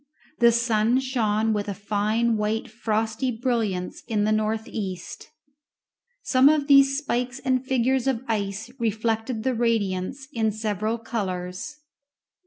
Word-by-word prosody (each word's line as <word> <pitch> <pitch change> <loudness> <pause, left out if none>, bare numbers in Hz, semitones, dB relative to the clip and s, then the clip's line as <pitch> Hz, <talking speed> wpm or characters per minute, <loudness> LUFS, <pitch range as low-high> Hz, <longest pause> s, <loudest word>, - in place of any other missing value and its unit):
The 235 -1 +6
sun 230 +1 +2
shone 225 -4 0
with 205 -1 -2
a 200 - -3
fine 215 +3 0
white 215 +1 -1
frosty 220 +2 -1
brilliance 225 -6 -2
in 210 -2 0
the 215 - +2
north 215 +1 0
east; 190 -4 -6 0.9
some 260 +1 +5
of 300 -2 +2
these 275 -1 +6
spikes 250 -3 -2
and 260 -1 0
figures 260 0 +1
of 260 -2 0
ice 210 +1 -2
reflected 225 +1 -1
the 260 0 +1
radiance 230 +1 -1
in 220 -2 +1
several 215 +1 -2
colours. 200 +5 -4
225 Hz, 130 wpm, -25 LUFS, 215-255 Hz, 0.9 s, The